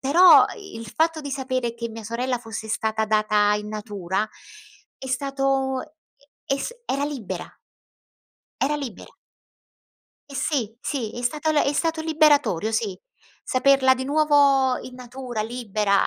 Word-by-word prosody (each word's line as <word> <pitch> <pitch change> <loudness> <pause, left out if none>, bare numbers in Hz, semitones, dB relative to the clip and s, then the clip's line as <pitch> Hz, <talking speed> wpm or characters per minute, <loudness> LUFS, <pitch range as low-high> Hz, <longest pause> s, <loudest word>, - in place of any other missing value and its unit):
però 340 +7 +7
il 310 - -9
fatto 320 +5 +1
di 285 -2 -6
sapere 255 -3 -2
che 235 0 -4
mia 225 0 -8
sorella 245 +3 -2
fosse 225 -2 -7
stata 220 0 0
data 215 -1 +3
in 210 0 -4
natura 210 -2 -3 0.7
è 265 - -8
stato 270 0 0 0.6
e 275 - +1
es 280 - -4
era 280 +1 0
libera. 275 -9 -5 1.1
Era 290 +3 +1
libera. 265 -9 -7 1.2
E 280 - -10
sì, 240 -7 -1
sì, 255 -8 -3
è - - -5
stata 300 +5 0
le 300 - +3
è 280 - +1
stato 325 +2 0
liberatorio, 295 - +3
sì, 215 -4 -1 0.4
saperla 265 0 +4
di 260 0 -4
nuovo 280 -3 +4
in 255 - -10
natura, 250 -2 -5
libera, 215 -4 0
255 Hz, 140 wpm, -24 LUFS, 220-280 Hz, 1.2 s, però